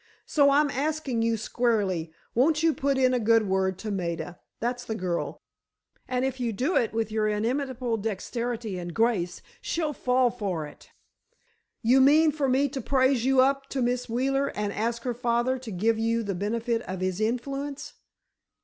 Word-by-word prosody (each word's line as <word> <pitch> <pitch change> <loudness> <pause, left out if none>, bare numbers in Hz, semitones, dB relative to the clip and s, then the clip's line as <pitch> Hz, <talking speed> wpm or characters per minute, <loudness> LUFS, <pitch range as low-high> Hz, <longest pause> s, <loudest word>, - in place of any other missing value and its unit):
So—I'm 285 0 +4
asking 280 -3 -1
you 230 0 +1
squarely—won't 225 - 0
you 325 -1 +4
put 275 -1 0
in 255 -1 +3
a 250 - +2
good 225 -1 +3
word 190 -1 0
to 215 +2 -5
Maida, 175 -3 -3 0.2
that's 245 +1 -2
the 220 - -4
girl—and 215 +6 -5
if 265 -1 -3
you 240 -2 -1
do 260 - -1
it 230 - +2
with 225 -1 -2
your 215 -1 +1
inimitable 240 +2 -1
dexterity 225 0 -3
and 175 -1 -6
grace, 210 -7 0 0.2
she'll 315 -3 -1
fall 250 -1 +2
for 195 -9 -3
it." 150 - -14 0.9
"You 255 +4 +5
mean 305 +4 +6
for 285 -2 -1
me 270 +3 +3
to 270 0 -4
praise 260 -1 +2
you 265 -1 +5
up 275 +1 +1
to 265 -2 -1
Miss 245 0 -1
Wheeler 270 +4 +1
and 205 -1 -2
ask 230 +2 -2
her 245 - -1
father 240 +2 0
to 245 -2 -9
give 220 +4 +1
you 230 +1 +1
the 200 -2 -2
benefit 225 +5 -1
of 185 0 -4
his 185 +2 -1
influence?" 275 +5 -3
235 Hz, 165 wpm, -27 LUFS, 215-265 Hz, 0.9 s, mean